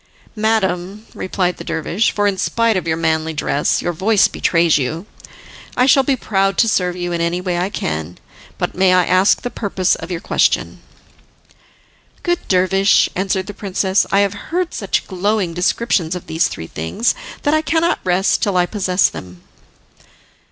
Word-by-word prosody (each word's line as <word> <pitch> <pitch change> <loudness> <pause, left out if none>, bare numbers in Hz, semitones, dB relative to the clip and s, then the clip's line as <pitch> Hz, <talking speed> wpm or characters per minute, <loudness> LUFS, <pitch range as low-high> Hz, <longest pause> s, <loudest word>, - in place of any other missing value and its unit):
"Madam," 210 -2 -1
replied 185 -1 -2
the - - -8
dervish, 165 +5 0
"for 205 - -1
in 200 -1 +2
spite 230 +3 +1
of 185 -2 -2
your 160 0 0
manly 160 0 0
dress 150 -1 0
your 175 - -1
voice 200 +5 +3
betrays 170 -2 +2
you, 160 +7 -3 0.7
I 250 - +4
shall 270 +1 +5
be 270 0 +1
proud 195 -4 0
to 230 - +4
serve 180 -4 0
you 175 -1 -4
in 170 -1 -2
any 170 +1 0
way 180 -1 -2
I 180 +2 -1
can. 80 - -4 0.4
But - - -2
may 185 0 +3
I 180 -1 +4
ask 185 +3 +3
the 245 - -3
purpose 190 -3 0
of 165 - -5
your 175 -2 -3
question?" - - 0 1.4
"Good 350 -1 0
dervish," 190 +1 +3
answered 190 0 -1
the 205 - -7
princess, 190 -1 0
"I 200 - +4
have 200 -1 +1 0.2
heard 355 +1 -1
such 200 - -2
glowing 190 -1 -1
descriptions 180 -1 0
of 180 - -7
these 160 +2 +1
three 80 - -7
things, 80 - -1 0.3
that 290 - +2
I 310 - +3
cannot 320 +3 +1
rest 185 +2 +1
till 200 -3 +1
I 180 - +3
possess 185 -1 +1
them." 90 -1 -10
185 Hz, 175 wpm, -18 LUFS, 175-210 Hz, 1.4 s, shall